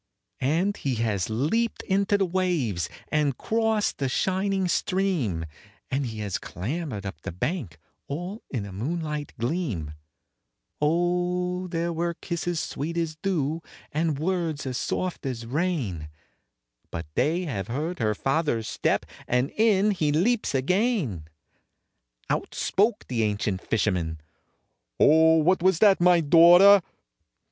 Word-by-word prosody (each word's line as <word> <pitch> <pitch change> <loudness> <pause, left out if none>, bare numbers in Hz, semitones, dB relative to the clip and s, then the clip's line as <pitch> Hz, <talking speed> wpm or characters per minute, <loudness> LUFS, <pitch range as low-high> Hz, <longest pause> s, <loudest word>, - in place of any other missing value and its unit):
And 170 +10 +1
he 135 -3 -2
has 110 -5 -1
leaped 160 - 0
into 200 +1 +2
the 195 - +2
waves, 170 - -1 0.2
and 145 -4 +1
crossed 220 -1 0
the 135 -2 0
shining 190 +5 0
stream, 175 - 0 0.5
And 135 0 0
he 110 -1 -6
has 100 -3 -2
clambered 115 - -5
up 95 -6 -6
the 95 - -5
bank, 95 - -3 0.3
all 175 +9 -5
in 120 -7 -3
the 100 - -8
moonlight 150 - -3
gleam; 120 - -2 0.9
Oh 180 +3 0
there 170 -1 -2
were 170 +1 -1
kisses 170 -1 -3
sweet 160 +4 -4
as 165 -2 -1
dew, 160 -3 -1 0.3
and 155 -1 0
words 165 -2 -1
as 130 -1 -3
soft 185 +7 -2
as 120 -3 -4
rain, 125 - -2 0.8
But 85 0 -5
they 160 - +1
have 100 - -4
heard 155 +9 -3
her 110 -2 +1
father's 135 -4 0
step, - - 0 0.2
and 125 +3 +1
in 210 -2 +3
he 155 -7 0
leaps 205 - +1
again! 155 - 0 1.0
Out - - -2
spoke 210 +3 +1
the 120 -3 -1
ancient 105 -3 -1
fisherman, 90 -8 -1 0.8
"Oh, 160 +1 +6
what 175 +3 +3
was 185 -1 +3
that, 195 -1 +5
my 175 -1 +5
daughter?" 175 +6 +8
160 Hz, 130 wpm, -26 LUFS, 120-180 Hz, 1.0 s, daughter